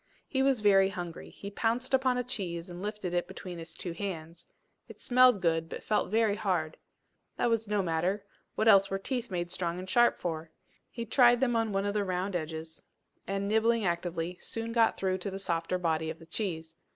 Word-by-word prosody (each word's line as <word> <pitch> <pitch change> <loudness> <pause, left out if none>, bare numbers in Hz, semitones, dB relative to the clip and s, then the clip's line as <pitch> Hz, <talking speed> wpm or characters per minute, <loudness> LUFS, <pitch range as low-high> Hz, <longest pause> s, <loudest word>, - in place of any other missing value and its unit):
He 265 - 0
was 265 -4 +2
very 195 -2 +5
hungry. 175 -3 -6
He 200 - -9
pounced 240 +5 -1
upon 260 -1 +3
a 250 - 0
cheese 180 -8 -4
and 175 +1 -8
lifted 205 -3 -4
it 175 0 0
between 180 -2 -8
his 165 0 -9
two 175 - -5
hands; 170 -2 -6 0.4
it - - -13
smelled 250 -5 +5
good, 165 -1 +1
but - - -7
felt 210 - +1
very 220 0 +2
hard. 180 -7 -1 0.6
That 240 - +2
was 225 -1 0
no 205 -1 +1
matter: 180 +4 -1 0.3
what 220 - +1
else 195 -2 +7
were 195 - -1
teeth 245 +4 -3
made 175 -2 -3
strong 175 -1 -2
and 185 +1 -6
sharp 240 +5 +4
for? 160 -2 -4 0.4
He 235 -1 -5
tried 240 +1 +5
them 245 -2 +2
on 225 -1 +1
one 195 0 0
of 205 - 0
the 210 -1 +1
round 185 0 -2
edges, 160 0 -5 0.5
and, 195 0 -1
nibbling 220 +1 +2
actively, 175 0 -2
soon 230 0 -3
got 230 -1 +3
through 190 -1 0
to 190 - -3
the 195 - -5
softer 170 -2 -1
body 160 -2 0
of 160 - -5
the 165 - -14
cheese. 165 -3 -4
195 Hz, 205 wpm, -30 LUFS, 170-225 Hz, 0.6 s, else